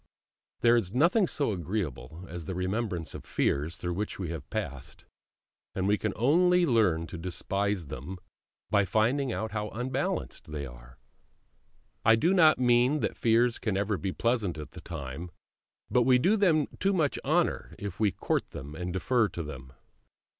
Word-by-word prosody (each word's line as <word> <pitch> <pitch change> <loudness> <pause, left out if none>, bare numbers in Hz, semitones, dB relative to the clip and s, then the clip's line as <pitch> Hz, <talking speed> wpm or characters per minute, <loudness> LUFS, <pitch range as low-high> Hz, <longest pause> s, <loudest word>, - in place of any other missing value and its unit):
There 120 0 +6
is 110 -3 0
nothing 175 - +4
so 140 -8 0
agreeable 85 - -4
as 85 -1 -7
the 95 - -4
remembrance 90 -4 -2
of - - -8
fears 75 +6 -1
through 90 -1 -3
which 105 +4 -3
we 90 -4 -4
have 80 -5 -7
passed; 65 -2 -5 0.7
and 95 0 0
we 105 - +4
can 110 - -1
only 180 +8 +4
learn 105 - +2
to 85 0 -8
despise 95 +2 -1
them 70 +7 -7 0.5
by 100 -2 +4
finding 120 +7 +1
out 110 0 -3
how 105 0 -3
unbalanced 125 - -3
they 75 -2 -4
were. - - -14 1.1
I 115 0 +6
do 165 +11 +2
not 160 -5 +6
mean 125 +3 +3
that - - -1
fears 115 +1 +2
can 105 -4 -1
ever 100 +1 0
be 95 0 -3
pleasant 115 -6 0
at 75 - -8
the - - -10
time, 80 +1 -6 0.6
but 125 - +4
we 125 +1 +5
do 185 - +3
them 170 -8 +3
too 195 +1 +2
much 155 -6 +1
honour 165 +4 0
if 100 -4 -6
we 105 -3 +3
court - - -1
them 70 +2 -8
and 90 +2 -4
defer 115 +5 +2
to 85 -1 -5
them. 65 -4 -9
105 Hz, 170 wpm, -29 LUFS, 85-125 Hz, 1.1 s, There